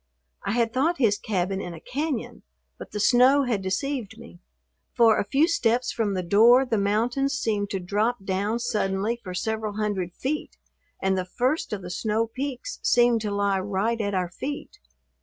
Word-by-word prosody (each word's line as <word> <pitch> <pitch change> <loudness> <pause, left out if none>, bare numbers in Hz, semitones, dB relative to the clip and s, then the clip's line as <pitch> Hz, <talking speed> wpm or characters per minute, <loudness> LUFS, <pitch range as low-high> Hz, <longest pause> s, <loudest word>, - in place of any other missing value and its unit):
I - - -1
had 230 -1 +1
thought 315 +7 +1
his 215 -5 +2
cabin 195 -1 -1
in 175 -2 -6
a - - -10
cañon, 285 - -4 0.4
but - - -9
the 210 - -5
snow 255 +6 +5
had 235 -6 -1
deceived 220 +3 -3
me, 235 -6 -13 0.6
for 230 -2 +5
a - - +1
few 275 +10 +2
steps 245 -7 +1
from 210 -4 -1
the 185 - -2
door 230 +8 +6
the 225 -4 0
mountains 240 +7 +1
seemed 210 -6 -1
to 195 - -2
drop 205 +4 -1
down 200 +4 0
suddenly 215 0 -1
for 185 -2 -6
several 220 +2 -2
hundred 200 -4 -2
feet 300 +4 -4 0.5
and 190 0 +2
the 185 -1 -1
first 255 - -1
of 200 -3 -4
the 180 - -6
snow 220 +4 0
peaks 270 - -5
seemed 240 -2 +3
to 210 - -2
lie 200 -1 +1
right 205 +4 -1
at 200 -1 -1
our 180 -2 0
feet. 285 +9 -6
220 Hz, 180 wpm, -25 LUFS, 195-245 Hz, 0.6 s, door